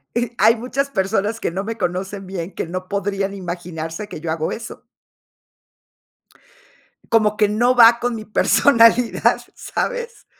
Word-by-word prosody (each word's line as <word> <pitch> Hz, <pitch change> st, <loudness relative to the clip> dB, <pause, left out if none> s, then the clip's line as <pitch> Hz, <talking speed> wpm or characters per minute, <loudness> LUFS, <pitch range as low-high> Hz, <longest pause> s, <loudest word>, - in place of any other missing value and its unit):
e 240 Hz, -1 st, -1 dB
hay 225 Hz, +2 st, +6 dB
muchas 255 Hz, +4 st, -2 dB
personas 210 Hz, -1 st, -1 dB
que -, -, -1 dB
no 190 Hz, +4 st, -4 dB
me 225 Hz, +1 st, -4 dB
conocen 190 Hz, +1 st, -4 dB
bien, 185 Hz, -1 st, -5 dB
que -, -, -4 dB
no 185 Hz, +1 st, -5 dB
podrían 200 Hz, 0 st, -2 dB
imaginarse 175 Hz, 0 st, -6 dB
que 155 Hz, -, -8 dB
yo 165 Hz, -1 st, -4 dB
hago 160 Hz, 0 st, -2 dB
eso. 230 Hz, +1 st, -8 dB, 2.3 s
Como 215 Hz, -2 st, +3 dB
que 210 Hz, -1 st, +3 dB
no 240 Hz, +4 st, +2 dB
va 235 Hz, -1 st, +7 dB
con 245 Hz, -1 st, -1 dB
mi 215 Hz, -1 st, -6 dB
personalidad, 230 Hz, +1 st, +3 dB
¿sabes?, 485 Hz, -1 st, -4 dB
210 Hz, 145 wpm, -20 LUFS, 185-230 Hz, 2.3 s, va